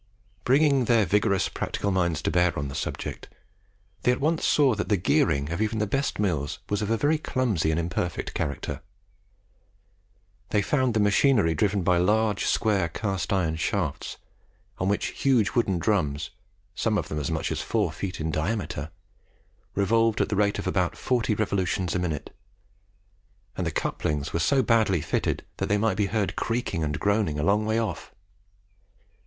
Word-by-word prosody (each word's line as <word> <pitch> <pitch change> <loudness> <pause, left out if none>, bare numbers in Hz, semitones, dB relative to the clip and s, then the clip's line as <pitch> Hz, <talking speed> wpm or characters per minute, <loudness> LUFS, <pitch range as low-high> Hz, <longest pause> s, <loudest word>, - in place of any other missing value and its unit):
Bringing 140 -1 +4
their 115 -3 +4
vigorous 100 +1 +2
practical 100 - -2
minds 85 -4 0
to - - 0
bear 90 -1 +2
on 70 -1 -2
the - - -7
subject, - - -5 0.7
they 125 - +3
at 125 - -1
once 160 +3 0
saw 140 -4 +4
that 105 -1 -3
the 105 - +3
gearing 70 -4 +1
of 85 - -2
even 110 +1 0
the 105 - +1
best 135 +7 -1
mills 75 -7 -1
was 105 0 0
of 105 - -2
a 115 - +2
very 150 +5 +2
clumsy 120 - 0
and 80 +1 +1
imperfect 85 -1 -3
character. 75 -4 -3 1.7
They 105 -1 +2
found 130 -5 +1
the - - +3
machinery 105 - +3
driven 100 +4 +1
by 90 0 +3
large 105 +2 +2
square 100 -6 +1
cast 100 +2 -3
iron 85 -5 +1
shafts, 80 -3 -2 0.6
on 95 - 0
which 100 - -2
huge 125 -7 +3
wooden 100 -7 +1
drums, 80 -7 0 0.4
some 110 +2 0
of - - -2
them 75 - -3
as 75 - -2
much 80 -2 -2
as - - -2
four - - 0
feet 95 -2 -5
in 80 +1 -2
diameter, 80 -3 -2 0.9
revolved 115 +3 +2
at - - +1
the 105 - 0
rate 100 0 +2
of - - -4
about - - 0
forty 120 -4 0
revolutions 95 -4 -1
a 95 - 0
minute; 80 -5 -4 1.2
and 90 - -2
the - - -1
couplings 75 -1 -2
were 85 - 0
so 130 +11 +3
badly 110 -7 +3
fitted - - -1
that - - -2
they 105 - +3
might 110 +1 +1
be 105 -2 +1
heard 105 -2 -1
creaking 115 -8 -2
and 75 -2 -2
groaning 100 -7 +1
a 75 - -1
long 105 +4 +2
way 110 +1 +1
off. 110 -6 -3
100 Hz, 175 wpm, -26 LUFS, 85-110 Hz, 1.7 s, Bringing